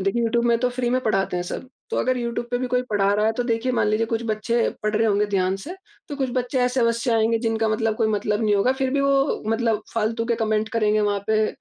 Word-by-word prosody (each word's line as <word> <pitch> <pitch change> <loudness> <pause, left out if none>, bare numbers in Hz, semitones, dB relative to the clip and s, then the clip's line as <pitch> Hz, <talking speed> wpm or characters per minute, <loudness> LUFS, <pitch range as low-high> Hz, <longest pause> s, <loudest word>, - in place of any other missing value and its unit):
देखिए, 195 +5 0
यूट्यूब 235 +1 +1
में 235 -1 +3
तो 250 +1 +1
फ्री 245 0 -2
में 255 +1 +1
पढ़ाते 195 -5 0
हैं 175 - -1
सब। 255 +8 -6 0.2
तो - - -2
अगर 255 0 +1
यूट्यूब 235 0 -3
पे 245 - 0
भी 255 - -2
कोई 250 0 +1
पढ़ा 200 -1 +2
रहा 210 +1 +2
है, 220 - +2
तो 245 - -2
देखिए, 235 +1 0
मान 240 - +1
लीजिए 215 +2 +1
कुछ 225 0 -2
बच्चे 225 +2 0 0.2
पढ़ 215 0 0
रहे 225 - +2
होंगे 205 -1 +2
ध्यान 190 -2 0
से, 295 - -8 0.3
तो 290 - -5
कुछ 265 -2 -1
बच्चे 250 +1 -1
ऐसे-वैसे 245 -1 +1
आएँगे, 225 +1 +2
जिनका 225 -1 0
मतलब 220 0 0
कोई 220 - +1
मतलब 210 0 0
नहीं 210 -1 +3
होगा, 225 +6 +3
फिर 265 -1 -1
भी 280 +1 +1
वो 275 0 +1
मतलब 225 -1 0
फ़ालतू 230 +1 0
के 235 - +1
कमेंट 215 0 0
करेंगे 215 -2 +2
वहाँ 205 -1 +1
पे, 215 0 +2
225 Hz, 260 wpm, -23 LUFS, 215-245 Hz, 0.3 s, में